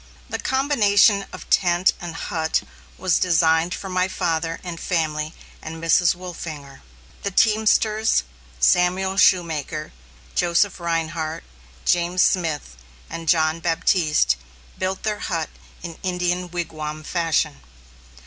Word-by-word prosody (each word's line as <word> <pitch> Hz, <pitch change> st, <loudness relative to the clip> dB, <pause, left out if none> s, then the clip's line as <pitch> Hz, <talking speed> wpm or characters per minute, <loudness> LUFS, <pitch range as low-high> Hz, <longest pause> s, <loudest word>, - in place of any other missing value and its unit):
The -, -, -2 dB
combination 210 Hz, -7 st, +3 dB
of -, -, -10 dB
tent 175 Hz, 0 st, +3 dB
and 170 Hz, -2 st, -6 dB
hut 160 Hz, -1 st, -1 dB, 0.3 s
was 185 Hz, -2 st, +1 dB
designed 165 Hz, -1 st, +2 dB
for 195 Hz, -, -7 dB
my 185 Hz, 0 st, +1 dB
father 165 Hz, -3 st, -2 dB
and 175 Hz, -2 st, -6 dB
family 155 Hz, -3 st, -2 dB, 0.3 s
and 160 Hz, -, -7 dB
Mrs. 165 Hz, +2 st, +3 dB
Wolfinger. 160 Hz, -6 st, -8 dB, 0.4 s
The 200 Hz, -, -1 dB
teamsters, 215 Hz, -, +3 dB, 0.4 s
Samuel 180 Hz, -, +2 dB
Shoemaker, 160 Hz, -5 st, +2 dB, 0.4 s
Joseph 175 Hz, +3 st, +1 dB
Rhinehart, 165 Hz, -1 st, -2 dB, 0.4 s
James 175 Hz, +1 st, +2 dB
Smith, 155 Hz, -, 0 dB, 0.4 s
and 165 Hz, -1 st, -5 dB
John 160 Hz, -1 st, +3 dB
Baptiste, 160 Hz, -, +2 dB, 0.4 s
built 185 Hz, 0 st, -2 dB
their 210 Hz, -1 st, -1 dB
hut 165 Hz, -5 st, -3 dB, 0.3 s
in 170 Hz, -2 st, -8 dB
Indian 180 Hz, -1 st, -1 dB
wigwam 155 Hz, -3 st, -5 dB
fashion. 160 Hz, -3 st, 0 dB
170 Hz, 110 wpm, -22 LUFS, 160-185 Hz, 0.4 s, combination